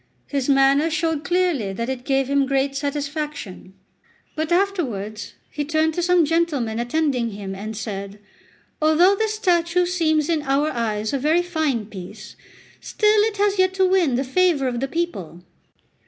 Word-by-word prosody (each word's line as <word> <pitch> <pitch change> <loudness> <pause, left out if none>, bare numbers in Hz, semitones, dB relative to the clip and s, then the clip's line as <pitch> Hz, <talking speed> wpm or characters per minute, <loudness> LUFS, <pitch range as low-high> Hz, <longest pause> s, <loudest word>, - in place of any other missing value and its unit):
His 280 -2 -2
manner 275 +3 +4
showed 320 -1 -1
clearly 350 - 0
that 230 +4 -3
it 255 -1 -5
gave 270 -1 +1
him 280 0 +1
great 275 0 0
satisfaction; 285 - -5 0.6
but 315 +2 -3
afterwards 270 - -1 0.2
he 295 - -3
turned 315 +2 +1
to 350 - -2
some 355 -1 +3
gentlemen 290 -9 0
attending 250 -1 0
him 200 -1 -6
and 210 +2 -6
said: 200 -2 -6 0.6
"Although 325 +6 +5
this 435 +1 -1
statue 355 -3 +2
seems 315 -4 +1
in 325 -3 0
our 285 +2 +1
eyes 220 -2 -2
a 275 - 0
very 315 +6 +2
fine 310 -10 -1
piece, 200 0 -10 0.4
still 425 0 +2
it 440 -2 -3
has 405 -1 +1
yet 370 0 +3
to 380 -1 +3
win 360 -9 +2
the 260 - 0
favour 295 0 +2
of 240 -1 -2
the 270 - -1
people. 200 - -4
290 Hz, 160 wpm, -22 LUFS, 240-345 Hz, 0.6 s, Although